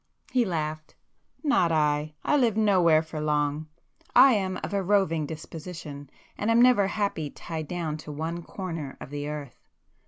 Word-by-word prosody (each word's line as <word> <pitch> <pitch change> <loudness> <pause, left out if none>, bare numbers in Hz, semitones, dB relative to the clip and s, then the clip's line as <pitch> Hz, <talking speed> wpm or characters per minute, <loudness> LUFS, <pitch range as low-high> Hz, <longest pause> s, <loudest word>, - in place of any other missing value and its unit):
He 250 -2 +3
laughed. 155 -4 -3 0.5
"Not 275 - +3
I! 150 -1 +1
I - - +3
live 235 -6 +2
nowhere 180 -7 +4
for 160 -1 -6
long. 150 0 0 0.5
I 260 +1 +8
am 190 -3 -1
of - - -4
a 200 - +1
roving 180 -6 +1
disposition, 155 -2 -8 0.3
and 210 - 0
am 230 +1 +5
never 240 -5 +5
happy 200 -7 -2
tied 160 +1 -6
down 165 -3 -3
to 155 -1 -9
one 160 +3 -4
corner 165 -6 -6
of - - -9
the 145 0 -4
earth. 145 -4 -8
165 Hz, 160 wpm, -27 LUFS, 150-200 Hz, 0.5 s, I